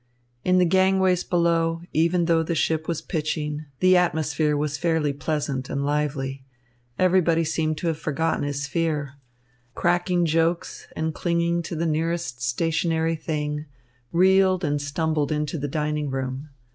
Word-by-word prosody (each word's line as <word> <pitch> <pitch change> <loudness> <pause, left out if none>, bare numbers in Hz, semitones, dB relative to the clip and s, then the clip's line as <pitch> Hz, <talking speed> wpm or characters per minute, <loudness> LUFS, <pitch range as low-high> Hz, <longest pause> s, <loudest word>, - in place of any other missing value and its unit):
In 185 0 +3
the 180 - +5
gangways 190 0 +3
below, 165 -1 +1
even 170 +2 +2
though 165 -1 +3
the 165 +1 -2
ship 160 0 0
was 170 -2 -2
pitching, 150 -2 -3 0.2
the 185 0 +6
atmosphere 155 -3 +1
was 150 0 -1
fairly 160 -4 +1
pleasant 140 -2 -2
and 140 0 -2
lively. 140 -2 -2 0.5
Everybody 175 -3 +3
seemed 155 0 -1
to 175 - -3
have 160 -2 -1
forgotten 160 +2 -1
his 145 0 -2
fear. 155 0 0
The - - -7
passengers, 140 - -13 0.6
cracking 175 0 +1
jokes 165 +1 0
and 160 0 -2
clinging 170 0 0
to 170 - -6
the 165 +2 -1
nearest 160 -6 -1
stationary 165 +5 0
thing, 150 -1 -3 0.4
reeled 185 +1 +4
and 145 -2 0
stumbled 150 0 -1
into 150 +1 -1
the 145 - -2
dining 150 0 -2
room. 135 +2 -4
160 Hz, 150 wpm, -24 LUFS, 150-170 Hz, 0.6 s, the